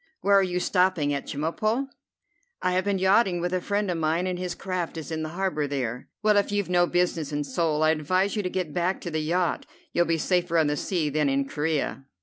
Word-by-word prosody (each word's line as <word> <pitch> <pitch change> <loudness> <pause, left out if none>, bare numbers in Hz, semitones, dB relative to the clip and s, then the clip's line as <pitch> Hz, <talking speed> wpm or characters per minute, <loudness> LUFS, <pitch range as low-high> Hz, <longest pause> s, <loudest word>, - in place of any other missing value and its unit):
Where 200 - +3
are 200 - +7
you 180 -1 0
stopping 180 -6 +2
at 140 - -4
Chemulpo?" 215 - -1 0.7
"I 185 - 0
have 185 +1 +1
been 200 -1 +1
yachting 190 -1 +3
with 175 +1 -2
a 185 - 0
friend 205 0 -1
of 170 - -2
mine, 160 +3 +1
and 180 -1 -2
his 180 -1 -3
craft 180 -3 -3
is 160 0 -6
in 160 0 -2
the 155 - -3
harbour 185 -6 0
there." 125 -4 -3
"Well, 210 -1 +4
if 205 - +2
you've 205 -3 -1
no 175 0 +4
business 170 -4 0
in 145 0 -1
Seoul, 155 +2 0
I 155 - +5
advise 185 +7 +1
you 210 - 0
to 180 - -2
get 180 -5 -3
back 180 +2 0
to 175 - -5
the 155 0 -1
yacht. 170 +3 0 0.3
You'll 175 - +3
be 165 -1 +1
safer 175 0 +1
on 160 - +4
the 145 0 +1
sea 155 -1 -1
than 150 -1 +1
in 135 0 0
Corea." 150 -2 -2
175 Hz, 235 wpm, -26 LUFS, 155-185 Hz, 0.7 s, are